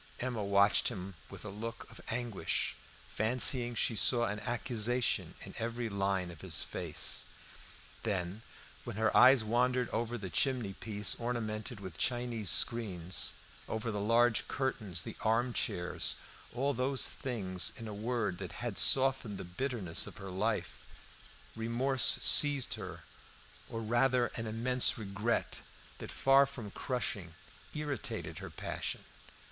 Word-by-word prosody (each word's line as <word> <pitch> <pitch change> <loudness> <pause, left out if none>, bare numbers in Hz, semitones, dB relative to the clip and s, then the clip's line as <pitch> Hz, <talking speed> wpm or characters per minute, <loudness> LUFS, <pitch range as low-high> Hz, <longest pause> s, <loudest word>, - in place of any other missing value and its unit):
Emma 120 -4 -2
watched 100 +1 +4
him 95 +1 -3 0.2
with - - -10
a - - -5
look 115 +3 -6
of - - -12
anguish, 120 -3 -1 0.3
fancying 120 +2 +2
she 115 - +1
saw 120 +3 +3
an 105 0 -3
accusation 120 0 0
in - - -8
every 115 0 -2
line 95 -3 -1
of 85 - -12
his - - -1
face. - - -1 0.8
Then, 95 -1 -2 0.4
when - - -6
her 110 +1 +1
eyes 130 -1 +7
wandered 125 +2 +1
over 120 +1 -2
the 95 -5 -7
chimney 125 -8 0
piece 105 0 0
ornamented 115 -2 -3
with 95 -5 -9
Chinese 120 -5 0
screens, 95 -7 +1 0.4
over 110 +1 -2
the 105 - -3
large 115 +2 +3
curtains, 105 -10 -1
the - - -7
armchairs, 115 -6 0 0.4
all 135 +4 0
those 130 +1 +2
things, 95 -8 0
in 115 - -6
a 105 - -6
word, 105 -3 -2
that 95 -3 -6
had, - - -4
softened 130 -6 +3
the - - -6
bitterness 95 -1 -1
of - - -10
her 95 -3 -7
life, 105 +4 -2 0.7
remorse 120 +4 +4
seized 145 -3 +5
her - - -7 0.7
or 115 - -4
rather 120 +2 +2
an 115 -1 -3
immense 125 +4 +2
regret, 105 +2 -2 0.4
that, - - -7
far 135 +1 +4
from 120 -7 -8
crushing, 100 - -3 0.4
irritated 150 -2 -4
her - - -7
passion. - - -4
115 Hz, 135 wpm, -33 LUFS, 100-125 Hz, 0.8 s, eyes